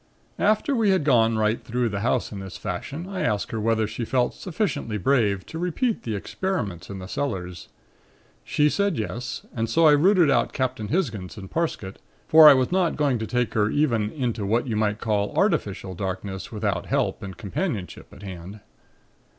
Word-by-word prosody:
"After 215 Hz, +7 st, +2 dB
we 225 Hz, -4 st, +2 dB
had 190 Hz, -5 st, +3 dB
gone 115 Hz, -5 st, +3 dB
right 110 Hz, +1 st, +1 dB
through 120 Hz, +1 st, -1 dB
the 100 Hz, -1 st, -3 dB
house 120 Hz, +3 st, 0 dB
in 100 Hz, -, -6 dB
this 95 Hz, -1 st, -8 dB
fashion, 165 Hz, +6 st, -5 dB
I 195 Hz, -1 st, -4 dB
asked 105 Hz, -, -1 dB
her 115 Hz, -, -2 dB
whether 110 Hz, 0 st, +1 dB
she 110 Hz, +3 st, -5 dB
felt 125 Hz, +1 st, +1 dB
sufficiently 160 Hz, -, -2 dB
brave 105 Hz, -3 st, +1 dB
to 160 Hz, -, -7 dB
repeat 190 Hz, +7 st, -1 dB
the 110 Hz, -2 st, -3 dB
experiments 100 Hz, -, -3 dB
in 100 Hz, -, -6 dB
the 95 Hz, -, -7 dB
cellars. 90 Hz, -6 st, -4 dB, 0.8 s
She 150 Hz, -, +2 dB
said 200 Hz, +2 st, +1 dB
yes, 115 Hz, +3 st, -4 dB
and 115 Hz, -1 st, -1 dB
so 165 Hz, +8 st, +3 dB
I 155 Hz, -, +8 dB
rooted 170 Hz, +1 st, +5 dB
out 120 Hz, -3 st, +1 dB
Captain 130 Hz, -5 st, -2 dB
Hisgins 115 Hz, -, -2 dB
and 95 Hz, -2 st, -9 dB
Parsket, 155 Hz, -, -3 dB, 0.3 s
for 155 Hz, -1 st, +9 dB
I 140 Hz, -, +8 dB
was 130 Hz, +2 st, +1 dB
not 180 Hz, -2 st, +2 dB
going 140 Hz, -5 st, +1 dB
to 110 Hz, -, -3 dB
take 125 Hz, -1 st, -1 dB
her 105 Hz, -1 st, +2 dB
even 115 Hz, -8 st, +1 dB
into 120 Hz, -7 st, -2 dB
what 115 Hz, +6 st, +1 dB
you 115 Hz, -4 st, -2 dB
might 105 Hz, 0 st, 0 dB
call 105 Hz, -2 st, -1 dB
artificial 105 Hz, -, 0 dB
darkness 95 Hz, +2 st, -5 dB
without 105 Hz, -4 st, -2 dB
help -, -, 0 dB
and 95 Hz, -2 st, -7 dB
companionship 105 Hz, -, -4 dB
at 95 Hz, -, -13 dB
hand. 95 Hz, +1 st, -8 dB
115 Hz, 185 wpm, -24 LUFS, 100-150 Hz, 0.8 s, for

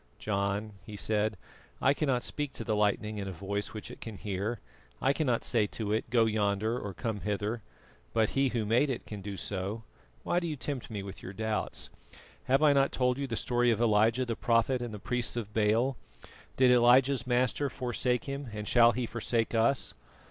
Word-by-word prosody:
"John," 100 Hz, +1 st, -1 dB
he 105 Hz, +2 st, -8 dB
said, 105 Hz, 0 st, 0 dB, 0.4 s
"I 140 Hz, -, +4 dB
cannot 135 Hz, -5 st, 0 dB
speak 145 Hz, -2 st, -3 dB
to -, -, -6 dB
the 110 Hz, -, 0 dB
lightning 105 Hz, 0 st, 0 dB
in 100 Hz, -, -4 dB
a -, -, -3 dB
voice 100 Hz, +3 st, -3 dB
which 105 Hz, -, -7 dB
it -, -, -12 dB
can 110 Hz, -3 st, -7 dB
hear. 100 Hz, +3 st, -3 dB, 0.4 s
I 135 Hz, -, +3 dB
cannot 135 Hz, -6 st, 0 dB
say 110 Hz, -4 st, +2 dB
to 105 Hz, 0 st, -3 dB
it 110 Hz, -, -1 dB
'go 115 Hz, -1 st, +4 dB
yonder,' 110 Hz, +2 st, 0 dB
or 100 Hz, -5 st, -6 dB
'come 110 Hz, 0 st, -3 dB
hither,' 105 Hz, +3 st, -2 dB, 0.5 s
but 110 Hz, -1 st, +2 dB
He 135 Hz, 0 st, +2 dB
Who 115 Hz, -3 st, -1 dB
made 120 Hz, +7 st, +3 dB
it 125 Hz, -2 st, -3 dB
can 105 Hz, -2 st, -7 dB
do 100 Hz, 0 st, -6 dB
so. 100 Hz, +4 st, -4 dB, 0.4 s
Why 175 Hz, -, +1 dB
do 170 Hz, -, -3 dB
you 155 Hz, -, -2 dB
tempt 135 Hz, 0 st, -4 dB
me 105 Hz, -3 st, -4 dB
with 95 Hz, -1 st, -8 dB
your 95 Hz, -, -7 dB
doubts? 110 Hz, +1 st, -3 dB, 0.5 s
Have 135 Hz, +4 st, +3 dB
I 150 Hz, -2 st, +6 dB
not 140 Hz, 0 st, +3 dB
told 125 Hz, 0 st, +1 dB
you 140 Hz, -, -2 dB
the 115 Hz, -, -3 dB
story 120 Hz, +1 st, +1 dB
of 115 Hz, -, +2 dB
Elijah 115 Hz, +2 st, +3 dB
the 115 Hz, -2 st, -2 dB
prophet 120 Hz, +3 st, +2 dB
and 120 Hz, -2 st, -4 dB
the 105 Hz, -, -6 dB
priests 120 Hz, +3 st, -1 dB
of 110 Hz, -3 st, -4 dB
Baal? 115 Hz, +4 st, +2 dB, 0.6 s
Did 130 Hz, -1 st, +6 dB
Elijah's 125 Hz, +2 st, +5 dB
Master 125 Hz, +3 st, +1 dB
forsake 125 Hz, 0 st, -1 dB
him, 140 Hz, -2 st, -5 dB
and 105 Hz, -1 st, -5 dB
shall 120 Hz, -1 st, +6 dB
He 125 Hz, +2 st, -1 dB
forsake 115 Hz, 0 st, -1 dB
us? 115 Hz, +4 st, +2 dB
115 Hz, 200 wpm, -30 LUFS, 105-125 Hz, 0.6 s, I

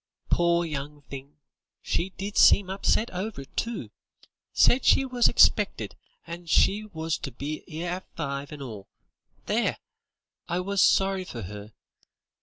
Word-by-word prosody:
"Pore 170 Hz, 0 st, +3 dB
young 145 Hz, -1 st, -6 dB
thing, 140 Hz, +2 st, -10 dB, 0.4 s
she 175 Hz, +3 st, -1 dB
did 195 Hz, +2 st, -6 dB
seem 190 Hz, -2 st, +6 dB
upset 205 Hz, +3 st, +1 dB
over 190 Hz, -3 st, -4 dB
it, 135 Hz, -, -15 dB
too. 235 Hz, 0 st, -3 dB, 0.6 s
Said 255 Hz, -, +4 dB
she 270 Hz, -, +5 dB
was 250 Hz, -2 st, +3 dB
expected, -, -, +3 dB, 0.3 s
and 170 Hz, 0 st, -8 dB
she 210 Hz, +5 st, +3 dB
was 160 Hz, -5 st, -3 dB
to 140 Hz, -, -6 dB
be 145 Hz, +5 st, -5 dB
'ere 170 Hz, +2 st, -4 dB
at 185 Hz, -, -16 dB
five, 140 Hz, -2 st, -4 dB
and 145 Hz, -2 st, -7 dB
all. 105 Hz, -6 st, -8 dB, 0.6 s
There! -, -, 0 dB, 0.7 s
I 175 Hz, -, -1 dB
was 195 Hz, +1 st, 0 dB
sorry 195 Hz, -1 st, +3 dB
for 120 Hz, -10 st, -7 dB
'er. 105 Hz, +2 st, -9 dB
170 Hz, 145 wpm, -27 LUFS, 140-195 Hz, 0.7 s, seem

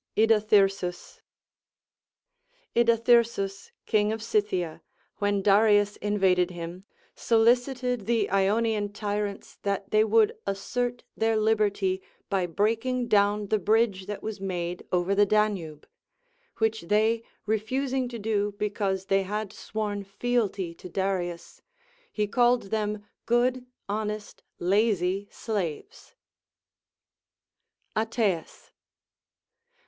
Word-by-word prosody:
Idathyrsus. 205 Hz, -4 st, +2 dB, 1.5 s
Idathyrsus, 230 Hz, -4 st, +2 dB, 0.2 s
King 210 Hz, -1 st, +2 dB
of 220 Hz, 0 st, -4 dB
Scythia, 205 Hz, -7 st, -1 dB, 0.4 s
when 205 Hz, -1 st, 0 dB
Darius 205 Hz, 0 st, +4 dB
invaded 190 Hz, -3 st, +2 dB
him, 175 Hz, +1 st, -7 dB, 0.3 s
solicited 245 Hz, 0 st, +1 dB
the 230 Hz, -3 st, +2 dB
Ionian 205 Hz, +1 st, +1 dB
tyrants 205 Hz, -1 st, -4 dB
that 200 Hz, -1 st, -2 dB
they 215 Hz, -, +5 dB
Avould 220 Hz, 0 st, +4 dB, 0.2 s
assert 245 Hz, +5 st, -2 dB
their 225 Hz, 0 st, +1 dB
liberty 205 Hz, -3 st, +1 dB, 0.3 s
by 190 Hz, -2 st, +1 dB
breaking 230 Hz, +7 st, 0 dB
down 205 Hz, -1 st, +2 dB
the 215 Hz, -, +2 dB
bridge 205 Hz, -1 st, +1 dB
that 210 Hz, -, -5 dB
was 215 Hz, -2 st, -5 dB
made 180 Hz, -2 st, -3 dB
over 180 Hz, +2 st, +1 dB
the 205 Hz, +1 st, +4 dB
Danube: 195 Hz, -8 st, 0 dB, 0.7 s
which 220 Hz, 0 st, 0 dB
they 220 Hz, +3 st, +2 dB, 0.2 s
refusing 255 Hz, +5 st, -1 dB
to 240 Hz, -, -6 dB
do 205 Hz, -1 st, -1 dB
because 200 Hz, -2 st, -1 dB
they 195 Hz, 0 st, +2 dB
had 210 Hz, +1 st, -4 dB
sworn 210 Hz, -2 st, -4 dB
fealty 200 Hz, -4 st, -1 dB
to 180 Hz, -, -11 dB
Darius, 175 Hz, -2 st, -3 dB, 0.5 s
he 210 Hz, -, 0 dB
called 240 Hz, -1 st, +2 dB
them 210 Hz, -1 st, -2 dB, 0.2 s
good, 250 Hz, +1 st, +1 dB, 0.2 s
honest, 210 Hz, 0 st, -4 dB, 0.2 s
lazy 195 Hz, 0 st, +1 dB
slaves. 210 Hz, -, -5 dB, 1.8 s
Ateas. 220 Hz, -6 st, -1 dB
210 Hz, 100 wpm, -27 LUFS, 195-225 Hz, 1.8 s, they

